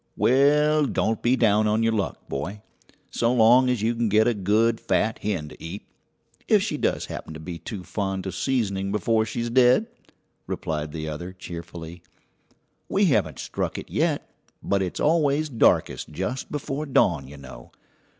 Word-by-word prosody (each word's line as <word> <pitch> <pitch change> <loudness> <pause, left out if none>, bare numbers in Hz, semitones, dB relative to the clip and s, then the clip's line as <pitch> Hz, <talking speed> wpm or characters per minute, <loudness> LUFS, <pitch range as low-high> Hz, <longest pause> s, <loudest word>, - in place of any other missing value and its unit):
"Well, 150 +3 +4
don't 110 -2 -1
be 125 +2 +3
down 110 -3 +3
on 110 +2 +1
your 115 0 +2
luck, 100 -3 -3
boy, 95 +10 -5 0.5
so 115 0 +1
long 125 +2 +5
as 125 -4 0
you 115 +2 +2
can 115 -1 0
get 110 +2 +4
a 120 - +3
good 110 +3 +1
fat 105 +4 0
hen 90 -8 -3
to - - -14
eat, 85 +6 -7 0.6
if - - +4
she - - -2
does - - -1
happen 80 - -7
to - - -8
be 85 +1 -7
too 100 -4 -7
fond 95 -1 -3
of 95 - -4
seasoning 100 -4 -1
before 110 +2 +1
she's 115 +2 -3
dead!" 125 - +5 0.6
replied 75 -1 -3
the 80 0 -5
other 85 +4 -6
cheerfully; 85 -1 -9 0.9
"we - - +3
haven't - - +1
struck - - -3
it - - -8
yet, - - 0 0.4
but 100 -1 +1
it's 90 -2 -3
always 155 -1 +2
darkest 120 -5 +2
just 130 +1 -4
before 150 +1 -4
dawn, 130 - +2
you 70 +2 -11
know. 65 -3 -12
110 Hz, 170 wpm, -24 LUFS, 90-125 Hz, 0.9 s, long